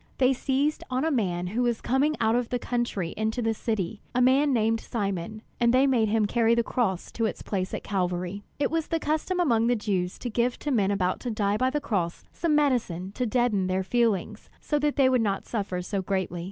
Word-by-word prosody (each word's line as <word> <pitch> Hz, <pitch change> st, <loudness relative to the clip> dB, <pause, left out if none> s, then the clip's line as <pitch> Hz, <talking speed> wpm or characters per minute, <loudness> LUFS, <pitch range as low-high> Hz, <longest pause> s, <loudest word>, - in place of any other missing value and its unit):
They 260 Hz, 0 st, +4 dB
seized 275 Hz, +4 st, 0 dB
on 255 Hz, +3 st, 0 dB
a 320 Hz, -, +1 dB
man 180 Hz, -9 st, 0 dB
who 215 Hz, +7 st, -1 dB
was 240 Hz, -2 st, +1 dB
coming 280 Hz, +4 st, +1 dB
out 225 Hz, 0 st, +2 dB
of 245 Hz, -1 st, 0 dB
the 250 Hz, -, 0 dB
country 240 Hz, -8 st, -2 dB
into 220 Hz, +3 st, -1 dB
the 225 Hz, -1 st, +1 dB
city, 215 Hz, -3 st, -3 dB
a -, -, +3 dB
man 265 Hz, +3 st, +4 dB
named 225 Hz, -2 st, +2 dB
Simon, 205 Hz, -1 st, -4 dB, 0.2 s
and 235 Hz, 0 st, +4 dB
they 260 Hz, +2 st, +4 dB
made 240 Hz, -6 st, +2 dB
him 220 Hz, 0 st, +2 dB
carry 230 Hz, +2 st, +3 dB
the 235 Hz, -, +2 dB
cross 200 Hz, -7 st, -1 dB
to 230 Hz, -, -1 dB
its -, -, -6 dB
place 185 Hz, -2 st, -2 dB
at -, -, -4 dB
Calvary. 180 Hz, 0 st, -2 dB
It 285 Hz, 0 st, 0 dB
was 325 Hz, -1 st, -1 dB
the 330 Hz, -, 0 dB
custom 315 Hz, +5 st, -1 dB
among 235 Hz, -9 st, +3 dB
the 245 Hz, -, +3 dB
Jews 190 Hz, -5 st, -2 dB
to 245 Hz, -, -5 dB
give 240 Hz, +2 st, 0 dB
to 295 Hz, -, -3 dB
men 205 Hz, -7 st, +2 dB
about 185 Hz, -2 st, 0 dB
to 245 Hz, -, -4 dB
die 205 Hz, -2 st, 0 dB
by 255 Hz, +3 st, +2 dB
the 295 Hz, +3 st, -1 dB
cross 180 Hz, -11 st, -2 dB
some 330 Hz, -3 st, +1 dB
medicine 230 Hz, -, +1 dB
to 250 Hz, +4 st, -2 dB
deaden 220 Hz, -5 st, +1 dB
their 185 Hz, +1 st, 0 dB
feelings, 225 Hz, -2 st, 0 dB
so 295 Hz, -, -1 dB
that 295 Hz, 0 st, 0 dB
they 270 Hz, -2 st, +4 dB
would 255 Hz, -2 st, +3 dB
not 200 Hz, -3 st, -1 dB
suffer 195 Hz, -5 st, -3 dB
so 195 Hz, +1 st, -2 dB
greatly. 190 Hz, -2 st, -2 dB
225 Hz, 225 wpm, -26 LUFS, 195-255 Hz, 0.2 s, They